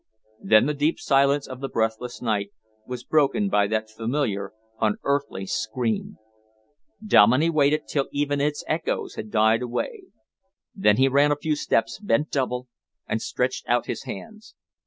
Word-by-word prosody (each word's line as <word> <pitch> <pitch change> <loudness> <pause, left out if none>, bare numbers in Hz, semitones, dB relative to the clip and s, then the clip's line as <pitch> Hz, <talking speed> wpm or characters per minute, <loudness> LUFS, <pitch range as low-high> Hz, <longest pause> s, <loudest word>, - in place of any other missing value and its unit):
Then 110 +1 +5
the 150 - 0
deep 150 +3 0
silence 140 0 +2
of 130 -1 -8
the 135 0 -4
breathless 115 +2 -2
night 105 -3 0 0.4
was 125 -1 -6
broken 155 +9 +2
by 100 - +3
that 110 +1 -1
familiar, 110 -3 -2 0.3
unearthly 120 -1 -1
scream. 110 +2 -2 0.9
Dominey 145 - +5
waited 150 -1 +2
till 140 -2 -1
even 145 0 0
its 150 +1 -1
echoes 160 +1 -2
had 110 - -7
died 110 +1 +3
away. 370 - -4 0.7
Then 105 - +3
he 135 +1 +4
ran 140 +2 +4
a - - +3
few 150 +1 -1
steps, 115 -5 0
bent 130 +7 0
double, 125 -2 -1 0.4
and 110 - -2
stretched 125 +1 -2
out 120 0 +2
his - - -5
hands. 215 - -9
130 Hz, 150 wpm, -24 LUFS, 110-145 Hz, 0.9 s, Then